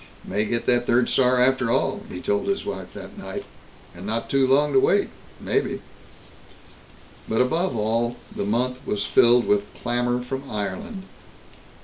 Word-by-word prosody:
"May 105 +3 0
get 115 +2 -1
that 120 0 +2
third 120 +1 +3
star 125 -1 +3
after 130 -1 +3
all," 135 - +1
he - - -7
told 205 -1 0
his 195 0 -1
wife 95 -3 -5
that - - -10
night. - - -6 0.5
"And 90 - -10
not 110 +3 -3
too 135 -1 +3
long 145 +2 +3
to 135 - +6
wait, - - +3 0.3
maybe." - - -1 1.5
But, 110 - +1
above 130 +2 +1
all, 115 +3 0 0.2
the - - -2
month 125 +4 0
was 100 -5 -2
filled 120 +3 +5
with 105 0 +1
clamor 120 0 -1
from 135 +2 -5
Ireland. 190 - -4
125 Hz, 155 wpm, -24 LUFS, 110-135 Hz, 1.5 s, to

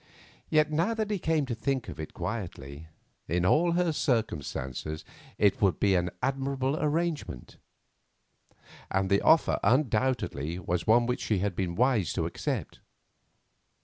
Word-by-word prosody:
Yet, 155 -1 +3
now 170 +9 +1
that 215 -1 -2
he 205 - 0
came 160 -3 +1
to 130 - -3
think 130 +2 -2
of 80 -3 -8
it 80 - -6
quietly, 85 -7 -5 0.4
in 85 +1 0
all 170 - +3
her 175 -1 +2
circumstances 80 - -2 0.3
it 105 +5 +2
would 95 -6 +2
be 100 -1 +3
an 90 -1 +1
admirable 135 0 0
arrangement, 155 - -2 1.3
and 95 0 0
the 100 - +4
offer 160 0 +4
undoubtedly 120 - +1
was 90 -1 -2
one 120 +2 +5
which 125 +1 -2
she 105 - 0
had 95 0 -1
been 90 -1 -2
wise 115 - +2
to - - -1
accept. - - -4
115 Hz, 145 wpm, -28 LUFS, 90-145 Hz, 1.3 s, one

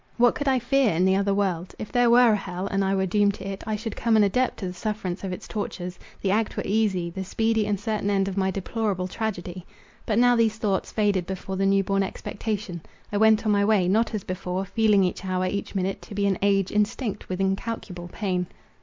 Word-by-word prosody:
What 240 0 +5
could 285 - -4
I 265 -1 +4
fear 250 -4 +2
in 180 +3 +3
the 190 0 +4
other 200 +1 +1
world? 190 -3 -1
If 215 - -7
there 245 -1 +4
were 240 0 +6
an - - +4
hell, 185 -2 -4
and 195 0 0
I 195 0 +1
were 190 0 +1
doomed 200 +2 +2
to 195 - -8
it, 195 0 -5
I 215 - 0
should 220 +1 -5
come 230 -2 +2
an 215 - +6
adept 250 +6 +1
to 195 - -5
the 180 - -4
sufferance 195 -1 -4
of 190 - -3
its 180 - -7
tortures—the 190 -2 -5
act 215 +2 0
were - - -1
easy, 195 -5 +1
the 190 +2 -4
speedy 220 +2 0
and 205 -2 0
certain 210 -1 -1
end 195 -1 +2
of 195 - -3
my 190 -1 +1
deplorable 195 0 -2
tragedy. 185 -4 -4 0.4
But 215 - +1
now 245 0 +5
these 225 -2 +2
thoughts 200 -3 -1
faded 205 -4 +1
before 190 0 -5
the 195 +1 +1
new 195 0 +3
born 195 +1 +1
expectation. 200 -2 -4 0.3
I 205 - 0
went 220 +1 +4
on 215 - +3
my 200 -1 +3
way, 200 -4 +3
not 220 +4 +2
as 205 - -3
before, 185 +1 -3
feeling 210 -1 +3
each 180 0 -2
hour, 185 -1 -1
each 200 +2 -3
minute, 190 0 -1
to 205 - -10
be 200 0 +1
an 195 -2 +1
age 195 -1 +2
instinct 210 +2 -1
with 185 0 -3
incalculable 195 -2 -3
pain. 180 -4 -2
200 Hz, 235 wpm, -25 LUFS, 190-220 Hz, 0.4 s, were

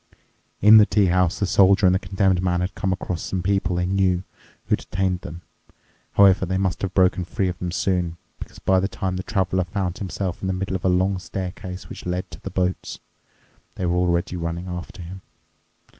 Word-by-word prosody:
In 105 +2 +9
the 105 - +7
tea 105 0 +3
house 90 -1 +2
the 100 - 0
Soldier 95 +1 +4
and 90 - +5
the 95 - +2
Condemned 95 -1 +1
Man 90 -1 0
had 90 +1 -2
come 95 +2 -2
across 90 -2 -3
some 95 -2 -3
people 95 -2 0
they 90 0 0
knew 95 -1 +1 0.4
who - - +2
detained 95 -1 -2
them. 85 +2 -9 0.7
However, 95 -1 +5
they 95 +1 -1
must 95 -2 -1
have 95 -1 -3
broken 90 -1 +3
free 90 +2 -2
of 90 - -6
them 90 - -3
soon, 90 -2 -1 0.2
because - - -10
by 95 0 +2
the 95 - 0
time 95 -2 -3
the 90 - -2
Traveler 95 -2 0
found 90 -1 -3
himself 95 -2 -4
in 95 - -2
the 95 - 0
middle 95 0 -3
of 95 - -4
a 95 - +3
long 95 +1 +1
staircase 90 +1 -6
which - - -9
led 90 +1 -3
to - - -10
the - - -6
boats, 90 0 -2 0.8
they 95 - -3
were 85 0 +1
already 90 0 +1
running 85 +1 -4
after 90 0 -7
him. 95 +3 -9
95 Hz, 205 wpm, -23 LUFS, 90-95 Hz, 0.8 s, In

